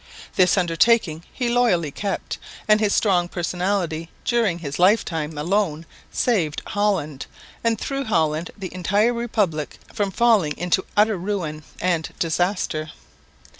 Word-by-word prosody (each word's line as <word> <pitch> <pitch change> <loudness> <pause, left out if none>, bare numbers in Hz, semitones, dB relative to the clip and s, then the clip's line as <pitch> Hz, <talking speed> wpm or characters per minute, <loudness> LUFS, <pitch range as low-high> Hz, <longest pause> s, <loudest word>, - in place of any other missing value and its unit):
This 180 0 +4
undertaking 170 -1 +2
he 250 - -2
loyally 230 -11 +2
kept, 200 +6 -4 0.3
and 215 0 +5
his 210 -2 +2
strong 180 -5 +2
personality 175 -2 -2 0.2
during 230 -8 +2
his 150 -3 -5
life 200 +5 +5
time 160 -2 -4
alone 165 -1 0 0.3
saved 175 -11 0
Holland, 190 -9 -1 0.4
and 230 -1 +2
through 275 0 -3
Holland 160 -5 +1
the 190 -4 -6
entire 205 +6 +2
Republic, 210 -10 -1 0.2
from 205 -3 0
falling 200 -8 +3
into 180 +2 +1
utter 210 0 +4
ruin 175 -5 -3 0.2
and 170 -3 0
disaster. 165 -2 -1
185 Hz, 130 wpm, -23 LUFS, 160-210 Hz, 0.4 s, and